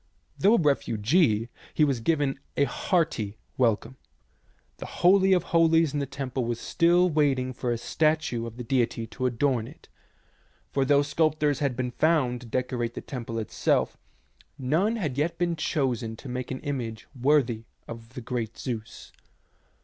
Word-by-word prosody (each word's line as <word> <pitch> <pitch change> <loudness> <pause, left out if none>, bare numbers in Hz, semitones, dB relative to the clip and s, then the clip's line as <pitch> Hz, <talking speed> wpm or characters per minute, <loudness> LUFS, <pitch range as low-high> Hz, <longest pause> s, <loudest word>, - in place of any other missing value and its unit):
Though 210 +4 +4
a - - +3
refugee, 120 - +2 0.3
he 155 - +4
was 135 -4 0
given 145 0 0 0.2
a 140 - +4
hearty 140 - 0 0.2
welcome. 115 0 +1 0.8
The - - -7
holy 190 +2 +4
of 185 -2 +4
holies 165 -2 +3
in 145 - 0
the 140 - -2
temple 135 -1 -3
was 120 0 -2
still 175 +6 +3
waiting 140 -5 +1
for 125 -1 -2
a 120 - 0
statue 155 -3 0
of 115 0 -10
the 125 - -5
deity 120 -2 0
to 130 +3 -2
adorn 125 -1 0
it, - - -15 0.8
for 135 -1 +1
though 140 +1 +4
sculptors 150 -1 +1
had 140 -4 0
been 125 0 -2
found 130 -6 +1
to 125 - -11
decorate 120 -1 -2
the - - -5
temple 115 -3 -6
itself, 110 - 0 0.6
none 165 - +1
had 150 - -2
yet 165 +3 0
been 170 -1 0
chosen 130 -7 -1
to 135 - -11
make 125 0 -4
an 130 - -5
image 120 -6 -4
worthy 130 -4 +1 0.2
of 115 +1 -10
the 125 - -5
great 115 -2 -4
Zeus. 115 -4 -6
130 Hz, 160 wpm, -27 LUFS, 120-155 Hz, 0.8 s, Though